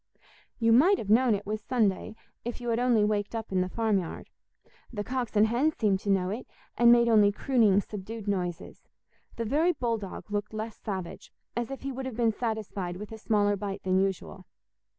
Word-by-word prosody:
You 230 -2 +2
might 345 - +6
have 210 - -3
known 235 0 +5
it 205 - -6
was 215 +1 -3
Sunday 220 -4 0 0.3
if 240 +1 -5
you 240 -1 -4
had 230 0 +1
only 245 -4 +3
waked 210 +1 -1
up 225 -2 -5
in 185 -1 +2
the 185 - -1
farmyard. 205 -5 -2 0.6
The 210 -4 -4
cocks 250 -1 -3
and 210 +1 +6
hens 255 +8 +1
seemed 200 -4 +2
to 200 - -5
know 190 -1 +2
it, 230 +5 -5 0.3
and 240 0 +6
made 235 0 +5
only 210 -3 +5
crooning 215 -3 +3
subdued 210 +2 -8
noises; 180 -3 -3 0.5
the 230 - -3
very 315 +10 +2
bull 230 -5 -1
dog 200 +1 -8
looked 205 +1 -3
less 220 0 -4
savage, 190 -5 -6 0.2
as 240 0 -2
if 270 -1 -7
he 275 - -3
would 260 0 -5
have 245 -4 -6
been 230 -2 +2
satisfied 210 -6 -3
with 210 +3 -8
a 220 - -8
smaller 205 -2 +2
bite 200 0 -5
than 185 0 +2
usual. 190 -1 -3
215 Hz, 200 wpm, -28 LUFS, 200-235 Hz, 0.6 s, might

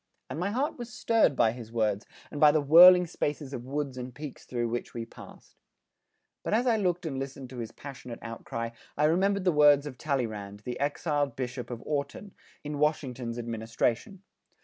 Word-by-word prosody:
And - - -4
my 180 +3 0
heart 260 +6 -1
was 240 0 -7
stirred 230 - +2
by 110 - +4
his 115 -1 -9
words 110 -2 0 0.2
and 145 - -5
by 150 -1 +8
the 155 - +3
whirling 180 +5 +8
spaces 145 -4 -3
of 125 -2 -6
woods 140 -2 -3
and 125 0 -7
peaks 150 -2 -8
through 120 -1 -2
which 120 +1 -4
we 115 -1 -4
passed. - - -14 0.9
But - - 0
as 240 +3 +2
I 240 -3 +4
looked 180 -4 0
and 135 -4 -3
listened 135 -1 -6
to - - -9
this 115 -2 -4
passionate 125 -2 -9
outcry, 115 0 -5 0.3
I 150 - +2
remembered 190 +5 +2
the 185 - +3
words 145 -2 +5
of 130 -4 -8
Talleyrand, 110 -8 -3
the 125 +3 -5
exiled 145 -1 -1
Bishop 125 -1 -5
of 120 -2 -6
Autun, 150 +7 -3 0.3
in 150 -1 -4
Washington's 130 -6 -1
administration. 115 - -2
140 Hz, 185 wpm, -29 LUFS, 120-160 Hz, 0.9 s, by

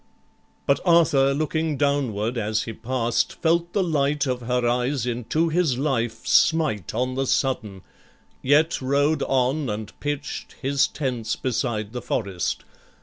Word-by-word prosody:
But 140 - +3
Arthur, 160 -6 +4
looking 155 +1 -1
downward 130 -6 0
as 110 -1 -1
he 115 - -6
past, 120 +1 -1
Felt 170 +1 +1
the 200 - +2
light 150 -3 +1
of 125 -2 -2
her 125 0 0
eyes 125 +1 0
into 125 +7 0
his 160 -6 +1
life 120 -4 -1
Smite 140 - +2
on 125 +2 0
the 135 +1 -1
sudden, 110 -10 -1 0.6
yet 150 +4 +3
rode 140 +3 +1
on, 135 +2 +1
and 105 0 -5
pitch'd 145 -1 -4
His 140 0 +2
tents 125 -6 -3
beside 115 -4 -2
the 125 - -4
forest. 100 -7 -2
130 Hz, 140 wpm, -24 LUFS, 120-145 Hz, 0.6 s, Arthur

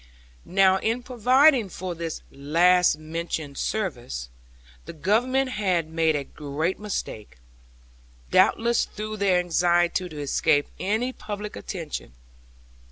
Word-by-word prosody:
Now 190 0 +4
in 230 +5 -1
providing 255 0 +4
for 185 0 -5
this 165 -1 -5
last 170 +5 +3
mentioned 155 -2 -5
service, 120 - -3 0.6
the - - -8
Government 245 - +1
had 180 -8 0
made 160 -1 +2
a 145 - -1
great 150 +6 -3
mistake, 110 - -5 0.9
doubtless 235 +1 +3
through 215 0 -6
their 195 -3 +3
anxiety 175 +1 +1
to 155 -2 -8
escape 145 +1 +1
any 225 +6 -1
public 210 -2 -6
attention. 165 - -6
180 Hz, 110 wpm, -25 LUFS, 155-215 Hz, 0.9 s, Now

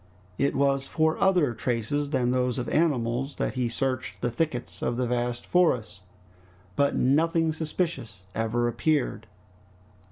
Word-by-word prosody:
It 140 +1 +1
was 135 0 +1
for 160 0 +1
other 180 -10 +3
traces 125 +5 -1
than 130 -4 +1
those 125 -1 0
of 125 -2 -3
animals 135 -4 0
that - - -2
he 125 -2 -1
searched 130 +1 -3
the 120 - +1
thickets 125 -1 -2
of 120 - -1
the 125 - +1
vast 120 0 -2
forest, 115 - +1 0.7
but 140 0 +2
nothing 160 +4 +2
suspicious 155 - -3
ever 115 +2 0
appeared. 125 -3 0
130 Hz, 135 wpm, -27 LUFS, 120-155 Hz, 0.7 s, other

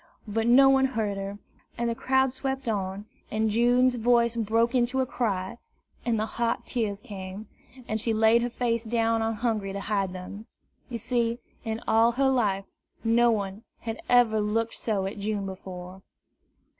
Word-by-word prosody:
But 225 +2 -1
no 265 +3 +7
one 270 0 +5
heard 205 -3 0
her; 195 +1 -5 0.4
and 235 - 0
the 235 - 0
crowd 265 +2 +1
swept 265 -1 -3
on, 200 -2 -2 0.2
and 220 0 0
June's 245 +3 +4
voice 235 0 +2
broke 230 +2 +1
into 250 +1 +1
a 260 - +2
cry, 220 -3 -2 0.4
and 235 -2 +1
the 215 - 0
hot 235 +1 -2
tears 210 -5 -2
came, 200 -2 -8 0.4
and 220 0 -1
she 230 - 0
laid 220 +1 +4
her 240 - -1
face 235 -1 -1
down 230 0 +1
on 225 0 0
Hungry 215 -4 -1
to 200 - -3
hide 200 -2 -1
them. 185 +4 -8 0.4
You 240 - -3
see, 235 0 0 0.3
in 225 0 -3
all 230 +2 +4
her 265 +2 +2
life, 200 -6 +1 0.4
no 235 +1 +4
one 200 -2 -1 0.2
had 225 0 -5
ever 235 -3 +4
looked 225 +2 0
so 205 -4 -1
at 200 +2 -5
June 205 -1 -2
before. 185 -1 -8
225 Hz, 170 wpm, -27 LUFS, 205-240 Hz, 0.4 s, no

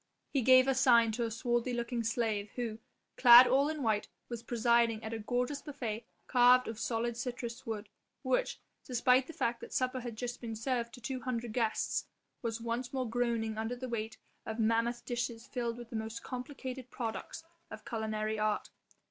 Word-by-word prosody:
He 275 - +2
gave 255 +2 +7
a 270 - +4
sign 240 -4 +5
to 235 +2 -1
a - - -2
swarthy 240 +2 -1
looking 235 0 -2
slave, 215 -2 -1
who, 230 -3 -3 0.4
clad 245 0 +10
all 270 +4 +3
in 310 -3 -3
white, 215 -2 +1 0.2
was 235 -2 -5
presiding 235 -1 +2
at 220 - -4
a 225 - -3
gorgeous 250 +5 -1
buffet 240 -7 -5 0.2
carved 250 0 +5
of 225 -1 -5
solid 235 +1 -1
citrus 240 -1 -5
wood 215 -2 -4 0.4
which - - 0 0.2
despite 250 +1 +3
the 330 - -8
fact 235 -4 -1
that - - -9
supper 255 0 0
had 240 -2 -6
just 245 +2 -5
been 225 -2 -5
served 235 +1 -1
to 245 - -14
two 260 +2 -3
hundred 240 -2 -3
guests 225 -2 0 0.4
was 230 -1 -2
once 235 +2 -3
more 260 -2 -2
groaning 225 -2 -1
under 225 +3 -2
the 255 +1 -6
weight 225 -2 -4 0.3
of 220 - -5
mammoth 230 +1 +1
dishes 235 -1 -3
filled 235 -2 -3
with 240 -1 -10
the - - -5
most 220 +1 -4
complicated 255 0 -6
products 230 +5 -5 0.3
of - - -10
culinary 215 -1 -2
art. 215 0 0
235 Hz, 180 wpm, -32 LUFS, 225-250 Hz, 0.4 s, clad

